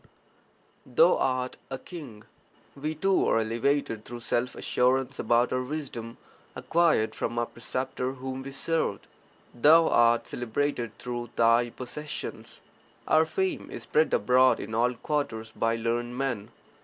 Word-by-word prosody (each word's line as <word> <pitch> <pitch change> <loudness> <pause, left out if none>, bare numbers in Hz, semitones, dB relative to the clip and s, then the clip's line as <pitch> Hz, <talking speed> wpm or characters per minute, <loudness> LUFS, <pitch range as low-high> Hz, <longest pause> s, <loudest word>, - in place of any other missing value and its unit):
Thou - - +4
art 130 -1 -1
a 135 - -4
king; 130 -9 -10 0.5
we 155 +3 -3
too 190 +4 +2
are - - +3
elevated 115 0 0
through 120 +1 -8
self 120 +2 -1
assurance 130 +1 +1
about 120 +2 +2
our 130 - +1
wisdom 125 -4 -6 0.4
acquired 165 -10 +2
from 120 - -3
our 120 - +1
preceptor 130 +2 -3
whom 130 0 -6
we 135 - -7
served. 160 +4 -1 0.5
Thou 160 +7 +6
art 120 0 +4
celebrated 120 0 -2
through 120 -1 -5
thy 115 +1 +4
possessions; 135 +5 -7 0.5
our 160 0 +4
fame 190 +4 -2
is - - -7
spread 155 +1 +2
abroad 125 +5 +4
in 110 - -6
all 120 +2 +2
quarters 115 -5 -3
by 115 +1 0
learned 120 +1 -2
men. 125 -6 -2
125 Hz, 135 wpm, -27 LUFS, 115-145 Hz, 0.5 s, Thou